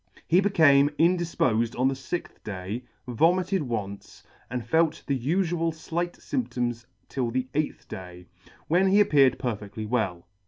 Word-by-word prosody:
He 175 +3 +5
became 150 -8 +5
indifpofed 160 -10 +1
on 130 - +4
the 135 - +1
fixth 135 +6 -6
day, 105 +4 -5 0.2
vomited 180 - +2
once, 105 -7 -5 0.3
and 125 -1 -4
felt 160 -1 +1
the 135 -2 -1
ufual 165 +4 0
flight 170 +2 -3
fymptoms 120 - -3 0.2
till 125 -3 -2
the 130 +2 -2
eighth 150 0 -2
day, 90 -1 -9 0.4
when 180 +4 +3
he 195 +2 +4
appeared 145 -10 +5
perfedtly 110 -3 -4
well. 105 -7 -1
135 Hz, 135 wpm, -26 LUFS, 115-170 Hz, 0.4 s, He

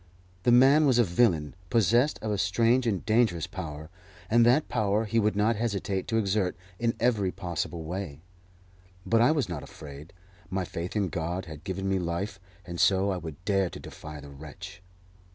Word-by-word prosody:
The 120 - +3
man 135 +5 +6
was 130 -3 +4
a 120 - +6
villain 85 - +2 0.2
possessed 120 +5 +3
of 110 - -1
a 105 - 0
strange 115 +8 +2
and 100 -5 -1
dangerous 110 -8 +2
power, 80 -5 -7 0.4
and 120 +1 +6
that 135 +6 +4
power 110 -1 +1
he 115 +2 +1
would 105 -1 +1
not 105 +2 +2
hesitate 100 -4 -2
to 115 - 0
exert 100 -3 0 0.2
in 115 -1 0
every 110 -6 +2
possible 85 -2 -4
way. 85 -3 -6 0.8
But 115 0 +3
I 120 - +5
was 145 -7 0
not 85 -5 -5
afraid; 70 +4 -11 0.4
my 95 -1 -2
faith 85 +3 -5
in 100 -3 +1
God 85 +3 -3
had 80 -2 -10
given 95 0 -3
me 95 -1 +1
life, 90 +4 -3 0.3
and 85 -1 -6
so 95 0 +3
I 95 - -1
would 85 0 -9
dare 95 -3 +2
to - - -9
defy 75 -1 -9
the 70 0 -11
wretch. 75 +5 -10
95 Hz, 185 wpm, -28 LUFS, 85-115 Hz, 0.8 s, man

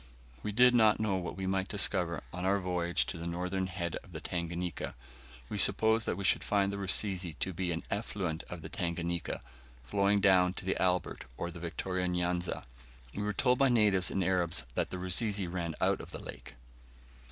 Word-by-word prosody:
We 105 - -3
did 125 +4 +6
not 110 -3 +5
know 110 -3 +1
what 90 -1 -5
we 95 - -3
might 95 0 0
discover 90 -4 +1
on 90 +1 -4
our 95 +2 +3
voyage 90 -2 0
to 85 - -5
the 85 - -5
northern 90 +2 -2
head 90 -2 -3
of - - -14
the - - -5
Tanganika; 85 0 -4 0.5
we - - -2
supposed 110 0 +5
that - - -1
we 100 - -4
should 95 - +3
find 100 -1 +1
the - - -3
Rusizi 95 -3 +2
to 95 - -1
be 90 0 -2
an 80 - -3
effluent 95 -6 -2
of 90 -3 -7
the - - -5
Tanganika, 85 -1 -3 0.4
flowing 100 +11 +2
down 95 -2 +4
to - - -6
the 95 - -1
Albert 90 -1 0
or 85 - -3
the 85 - -9
Victoria 90 +2 -2
N'Yanza. 90 0 -1 0.5
We 105 - -4
were 105 0 0
told 125 +5 +2
by 135 -1 +5
natives 105 -6 +4
and 95 - 0
Arabs 90 -2 +1
that - - -1
the 95 - -5
Rusizi 100 +2 +1
ran 85 -2 -3
out - - +1
of - - -10
the - - -7
lake. - - -9
90 Hz, 195 wpm, -31 LUFS, 85-100 Hz, 0.5 s, did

